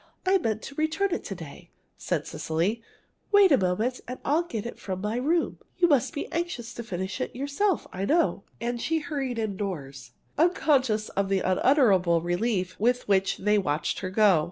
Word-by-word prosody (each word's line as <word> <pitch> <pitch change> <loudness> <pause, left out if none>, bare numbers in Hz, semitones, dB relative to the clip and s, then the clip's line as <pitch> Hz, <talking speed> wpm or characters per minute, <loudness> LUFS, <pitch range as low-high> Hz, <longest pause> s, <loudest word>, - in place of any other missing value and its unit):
I 380 +1 +4
meant 220 - -2
to - - -7
return 320 +6 0
it - - -2
to 195 - -5
day," 160 -5 -11 0.3
said - - -2
Cecily. 175 +9 -1 0.5
"Wait 405 -3 +6
a 275 - +7
moment 215 +8 0
and 250 +1 -5
I'll 300 +4 +3
get 235 -12 -5
it 235 - -7
from 185 -2 -4
my 210 +3 -2
room. 320 +7 0 0.2
You 355 -1 +4
must 270 -5 +3
be 295 - -4
anxious 330 -9 -3
to 235 - -6
finish 190 -2 -4
it - - -4
yourself, 285 +9 0
I 190 +1 -2
know." 320 -5 +2 0.2
And 235 +1 -3
she 325 - 0
hurried 275 -5 -3
indoors, 185 - -4 0.3
unconscious 275 - +2
of 200 0 -1
the 195 -1 +1
unutterable 185 - +3
relief 185 +1 -1
with 245 +4 +1
which 195 -1 +2
they 210 +1 +2
watched 155 -5 -1
her 185 - -4
go. 200 -3 +5
230 Hz, 180 wpm, -27 LUFS, 190-290 Hz, 0.5 s, a